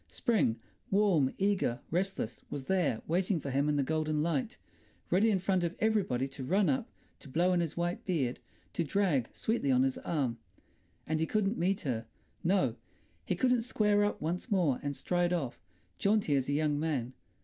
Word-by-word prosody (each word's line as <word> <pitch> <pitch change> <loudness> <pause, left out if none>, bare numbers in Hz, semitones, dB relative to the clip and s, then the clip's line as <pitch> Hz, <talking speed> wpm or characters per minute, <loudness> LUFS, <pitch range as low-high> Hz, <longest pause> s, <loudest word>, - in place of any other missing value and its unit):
Spring—warm, 195 - +1
eager, 195 -11 +1
restless—was 150 - -2
there, 170 -8 0
waiting 180 +2 +1
for 140 -2 -5
him 140 +3 +1
in 150 - +2
the 140 - +2
golden 155 +1 0
light, 230 +8 -1 0.5
ready 200 +5 +4
in 205 - +3
front 185 -1 +1
of 170 0 -1
everybody 200 - +1
to 135 0 -8
run 190 +9 +2
up, 260 -3 0 0.3
to 140 - -12
blow 175 +6 +2
in 180 - +2
his 165 -2 -2
white 175 +1 -1
beard, 140 -9 -1 0.3
to 170 - 0
drag 155 - +1
sweetly 220 -10 -1
on 130 0 +4
his 135 -1 0
arm. 130 -8 -1 0.7
And 155 0 -1
he 160 - +1
couldn't 210 +3 0
meet 190 +3 +1
her, 115 -7 -3 0.4
no; 185 +2 +2 0.5
he - - +1
couldn't 250 -2 +2
square 210 -3 +2
up 205 - 0
once 175 +9 -3
more 175 - +2
and 145 0 -3
stride 175 +2 0
off, 140 -9 -3 0.4
jaunty 200 -7 +2
as 135 -1 0
a - - +1
young 150 0 +1
man. 135 -6 -1
170 Hz, 175 wpm, -31 LUFS, 140-195 Hz, 0.7 s, ready